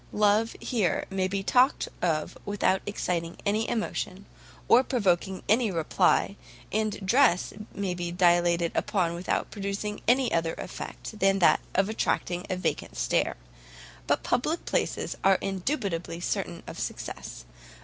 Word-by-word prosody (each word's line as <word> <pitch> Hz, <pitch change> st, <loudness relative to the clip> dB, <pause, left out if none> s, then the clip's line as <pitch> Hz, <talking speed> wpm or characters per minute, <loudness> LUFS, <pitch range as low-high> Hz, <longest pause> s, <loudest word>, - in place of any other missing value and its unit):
Love, 210 Hz, +2 st, +3 dB
here, 210 Hz, -9 st, 0 dB
may 190 Hz, -1 st, 0 dB
be 195 Hz, +1 st, -2 dB
talked 255 Hz, +6 st, +3 dB
of 160 Hz, -3 st, 0 dB
without 200 Hz, -2 st, +1 dB
exciting 175 Hz, -4 st, -2 dB
any 215 Hz, +2 st, +1 dB
emotion, 200 Hz, -3 st, -3 dB, 0.4 s
or 250 Hz, -, +6 dB
provoking 190 Hz, -6 st, 0 dB
any 225 Hz, +2 st, +3 dB
reply, 165 Hz, -4 st, +2 dB, 0.4 s
and 215 Hz, -2 st, -1 dB
dress 225 Hz, -4 st, +3 dB, 0.2 s
may 195 Hz, -2 st, -1 dB
be 175 Hz, -1 st, -4 dB
dilated 175 Hz, -1 st, +3 dB
upon 175 Hz, -4 st, 0 dB
without 175 Hz, +2 st, -2 dB
producing 200 Hz, +1 st, -4 dB
any 250 Hz, 0 st, +3 dB
other 165 Hz, -1 st, 0 dB
effect 215 Hz, -, -7 dB
than 195 Hz, -1 st, +4 dB
that 180 Hz, -, +5 dB, 0.2 s
of 195 Hz, +1 st, +3 dB
attracting 180 Hz, -4 st, -1 dB
a 185 Hz, -, 0 dB
vacant 185 Hz, -, -3 dB
stare; -, -, +1 dB, 0.7 s
but -, -, +1 dB
public 310 Hz, +7 st, 0 dB
places -, -, -1 dB
are 195 Hz, -1 st, +5 dB
indubitably 190 Hz, -, -2 dB
certain -, -, -3 dB
of -, -, -8 dB
success. -, -, -6 dB
195 Hz, 135 wpm, -27 LUFS, 175-215 Hz, 0.7 s, or